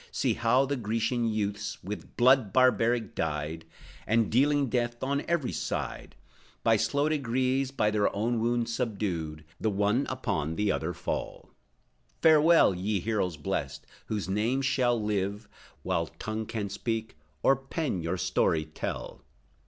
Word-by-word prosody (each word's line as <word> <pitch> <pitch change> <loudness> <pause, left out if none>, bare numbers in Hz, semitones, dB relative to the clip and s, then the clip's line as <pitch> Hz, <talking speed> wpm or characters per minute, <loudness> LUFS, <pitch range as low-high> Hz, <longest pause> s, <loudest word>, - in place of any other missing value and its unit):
See, - - +1
how 125 +4 +3
the 140 +1 -2
Grecian 115 +1 0
youths, 105 -2 -2
With 105 +3 -7
blood 125 -4 +5
barbaric 120 -3 +3
dyed, 75 +2 -3 0.4
And 110 +1 +2
dealing 140 +3 +3
death 120 0 -1
on 140 +2 0
every 170 -6 0
side, - - -4 0.5
By 115 - +5
slow 140 +7 +1
degrees 130 -2 0
by 105 -6 +1
their 105 -1 +2
own 115 +3 0
wounds 120 0 0
subdued, 90 -10 -3
The 110 - +1
one 105 +6 +1
upon 80 - -2
the 105 +1 +1
other 85 +3 -2
fall. - - -5 0.7
Farewell, 160 - +6
Ye 100 +3 -1
heroes 95 -4 -1
blessed, 75 - -3 0.2
whose 105 -4 -2
names 115 +8 0
shall 125 -3 +2
live, 105 0 -2 0.4
While 85 -3 0
tongue 110 +6 -5
can 105 -3 -3
speak, 110 +1 -3 0.3
or 135 - +5
pen 135 - -3
your 85 +3 -2
story 80 -2 +1
tell! 80 - -6
110 Hz, 140 wpm, -28 LUFS, 100-130 Hz, 0.7 s, Farewell